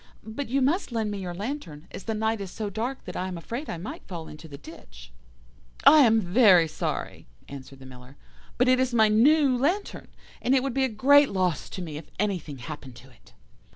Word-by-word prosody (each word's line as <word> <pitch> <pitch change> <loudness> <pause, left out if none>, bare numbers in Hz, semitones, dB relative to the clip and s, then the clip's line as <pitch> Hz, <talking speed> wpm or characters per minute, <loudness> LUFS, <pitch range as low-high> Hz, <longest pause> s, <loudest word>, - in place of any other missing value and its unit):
But 225 +5 -6
you 270 +2 +1
must 305 +3 0
lend 220 -3 -2
me 205 - -4
your 180 -2 -5
lantern, 195 - -6
as - - -9
the 220 - -2
night 220 0 -1
is 195 - -6
so 210 +2 -5
dark 235 +6 -4
that - - -8
I 185 - -2
am 180 -2 -5
afraid 235 - -6
I - - -4
might 165 - -7
fall 170 -4 -7
into 155 +2 -11
the 140 -2 -10
ditch.' 65 - -14 0.7
"'I 310 - +9
am 225 -5 +5
very 185 -3 +5
sorry,' 155 - -5 0.2
answered 135 -1 -10
the 135 - -14
Miller, 125 +1 -14 0.4
'but 250 - +3
it 255 0 +4
is 255 -2 0
my 220 -2 +5
new 270 +5 +4
lantern, 335 +11 -2 0.3
and 255 +2 +2
it 260 - +2
would 275 -2 -2
be 265 +1 +2
a - - -2
great 280 +6 +5
loss 185 -4 -1
to 185 - -6
me 155 -3 -7
if 155 - -11
anything 180 -8 -2
happened 130 0 -9
to 130 +3 -15
it. 120 - -23
210 Hz, 220 wpm, -26 LUFS, 160-255 Hz, 0.7 s, I